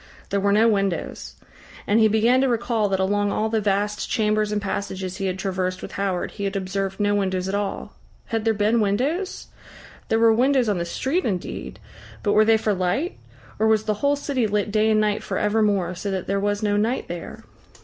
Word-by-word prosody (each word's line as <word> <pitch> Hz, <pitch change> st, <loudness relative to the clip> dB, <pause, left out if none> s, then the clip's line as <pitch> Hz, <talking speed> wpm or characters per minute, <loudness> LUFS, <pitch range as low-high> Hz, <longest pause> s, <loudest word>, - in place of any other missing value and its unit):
There 200 Hz, -, +1 dB
were 200 Hz, +1 st, +2 dB
no 215 Hz, +3 st, +5 dB
windows. 195 Hz, -5 st, -1 dB, 0.5 s
And 210 Hz, +2 st, +3 dB
he 220 Hz, -, +6 dB
began 225 Hz, +4 st, +3 dB
to 270 Hz, -, +2 dB
recall 230 Hz, -3 st, 0 dB
that 190 Hz, -1 st, 0 dB
along 205 Hz, +1 st, +1 dB
all 220 Hz, +2 st, 0 dB
the 220 Hz, -1 st, 0 dB
vast 205 Hz, +1 st, -1 dB
chambers 215 Hz, -2 st, +1 dB
and 210 Hz, -, 0 dB
passages 190 Hz, -2 st, -4 dB
he 195 Hz, -2 st, -2 dB
had 185 Hz, 0 st, -2 dB
traversed 185 Hz, -1 st, -2 dB
with -, -, -7 dB
Howard 195 Hz, -3 st, -2 dB
he 200 Hz, -, -5 dB
had 195 Hz, +1 st, -2 dB
observed 195 Hz, 0 st, -3 dB
no 205 Hz, 0 st, +2 dB
windows 190 Hz, -2 st, 0 dB
at 190 Hz, -, -3 dB
all. 200 Hz, -1 st, -3 dB, 0.3 s
Had 225 Hz, -2 st, -2 dB
there 225 Hz, -1 st, +2 dB
been 210 Hz, +3 st, +2 dB
windows? 280 Hz, -, -1 dB, 0.6 s
There 225 Hz, -, +3 dB
were 225 Hz, 0 st, +5 dB
windows 255 Hz, +1 st, +3 dB
on 200 Hz, -4 st, 0 dB
the 170 Hz, -, -2 dB
street 275 Hz, -, -1 dB
indeed, 185 Hz, -5 st, -4 dB, 0.4 s
but 205 Hz, -, +2 dB
were 215 Hz, +1 st, +5 dB
they 225 Hz, 0 st, +5 dB
for 215 Hz, -1 st, 0 dB
light? 190 Hz, -, -1 dB, 0.4 s
Or 220 Hz, -, +3 dB
was 220 Hz, -1 st, +3 dB
the 215 Hz, -, 0 dB
whole 285 Hz, 0 st, +3 dB
city 275 Hz, -5 st, -1 dB
lit 210 Hz, 0 st, -1 dB
day 215 Hz, +1 st, +2 dB
and 215 Hz, -1 st, +3 dB
night 210 Hz, -1 st, +1 dB
for -, -, -4 dB
evermore, 205 Hz, -4 st, +1 dB
so 185 Hz, +3 st, -5 dB
that 190 Hz, -2 st, -2 dB
there 200 Hz, 0 st, 0 dB
was 205 Hz, +1 st, -1 dB
no 205 Hz, -1 st, +1 dB
night 225 Hz, +5 st, 0 dB
there? 175 Hz, -1 st, -7 dB
205 Hz, 210 wpm, -23 LUFS, 195-220 Hz, 0.6 s, he